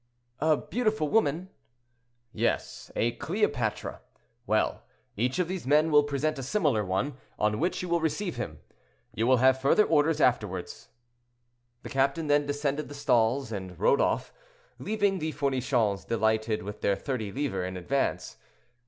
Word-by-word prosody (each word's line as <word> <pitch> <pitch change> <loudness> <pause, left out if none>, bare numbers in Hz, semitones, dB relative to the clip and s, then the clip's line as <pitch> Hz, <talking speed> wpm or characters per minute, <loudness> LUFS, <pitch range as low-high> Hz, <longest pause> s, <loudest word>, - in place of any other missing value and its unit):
"A 155 0 +3
beautiful 215 -6 -1
woman." 185 -3 +1 0.8
"Yes; - - -2
a 120 - +1
Cleopatra. 145 - -2 0.5
Well, - - +1 0.3
each 125 +5 0
of 180 -2 +1
these 180 -6 -5
men 155 +3 +4
will 150 -1 +7
present 145 +1 -1
a - - -3
similar 135 - +1
one, 100 +9 -2 0.2
on 105 0 +1
which 175 +3 -1
you - - -3
will 170 -1 +1
receive 175 +3 -1
him. 75 -1 -6 0.5
You 115 +3 0
will 130 0 +5
have 130 +1 +4
further 140 +10 +5
orders 155 0 +2
afterward." 105 -8 +1 1.1
The - - -7
captain 140 +3 +1
then 145 -1 +2
descended 145 0 -2
the 145 - -8
stall's 120 -1 +1
and 95 -4 -6
rode 140 +7 +4
off, - - 0 0.5
leaving 205 -3 0
the 155 -1 -3
Fournichons 130 -7 0
delighted 110 -1 0
with 105 +2 -7
their 100 - +2
thirty 110 -3 -4
livres 115 -9 -2
in 95 0 -6
advance. 135 +10 -2
140 Hz, 150 wpm, -28 LUFS, 110-155 Hz, 1.1 s, will